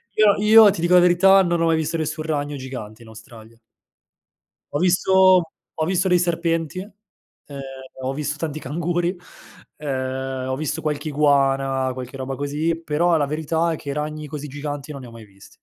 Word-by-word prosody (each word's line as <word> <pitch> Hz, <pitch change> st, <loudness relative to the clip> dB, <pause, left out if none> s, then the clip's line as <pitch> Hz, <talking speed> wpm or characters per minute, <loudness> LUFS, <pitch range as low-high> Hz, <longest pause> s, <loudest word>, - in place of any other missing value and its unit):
Io 215 Hz, -2 st, +5 dB
io 210 Hz, 0 st, +7 dB
ti 185 Hz, -, -5 dB
dico 175 Hz, +1 st, +2 dB
la -, -, +8 dB
verità: 180 Hz, +2 st, +5 dB
non 170 Hz, -2 st, 0 dB
ho -, -, +3 dB
mai 165 Hz, 0 st, +3 dB
visto 160 Hz, +1 st, -1 dB
nessun 155 Hz, 0 st, -3 dB
ragno 145 Hz, -2 st, -2 dB
gigante 125 Hz, -5 st, -8 dB
in -, -, -16 dB
Australia. 110 Hz, +1 st, -14 dB, 1.1 s
Ho 145 Hz, -, -1 dB
visto 185 Hz, +1 st, +4 dB, 0.3 s
ho 155 Hz, -, -1 dB
visto 185 Hz, +2 st, 0 dB
dei 180 Hz, -1 st, +3 dB
serpenti, 165 Hz, -1 st, -1 dB
ehm, 195 Hz, -7 st, -14 dB, 0.4 s
ho 130 Hz, +1 st, -2 dB
visto 150 Hz, +1 st, -3 dB
tanti 155 Hz, -1 st, -4 dB
canguri 175 Hz, +5 st, -2 dB, 0.6 s
ehm, 130 Hz, -2 st, -4 dB
ho 130 Hz, -, -1 dB
visto 155 Hz, +2 st, -3 dB
qualche 150 Hz, 0 st, -3 dB
iguana, 135 Hz, -2 st, +2 dB
qualche 130 Hz, +1 st, -8 dB
roba 135 Hz, 0 st, -4 dB
così, 150 Hz, +4 st, -2 dB
però 165 Hz, +2 st, +1 dB
la 145 Hz, -, +1 dB
verità 160 Hz, +3 st, -1 dB
è -, -, -2 dB
che 145 Hz, -, -9 dB
i -, -, -2 dB
ragni 150 Hz, +1 st, -4 dB
così 150 Hz, 0 st, -7 dB
giganti 145 Hz, +1 st, -6 dB
non 140 Hz, -2 st, -8 dB
ne 125 Hz, -, -10 dB
ho -, -, -13 dB
mai 115 Hz, -1 st, -12 dB
visti. 100 Hz, -1 st, -18 dB
150 Hz, 185 wpm, -22 LUFS, 135-170 Hz, 1.1 s, la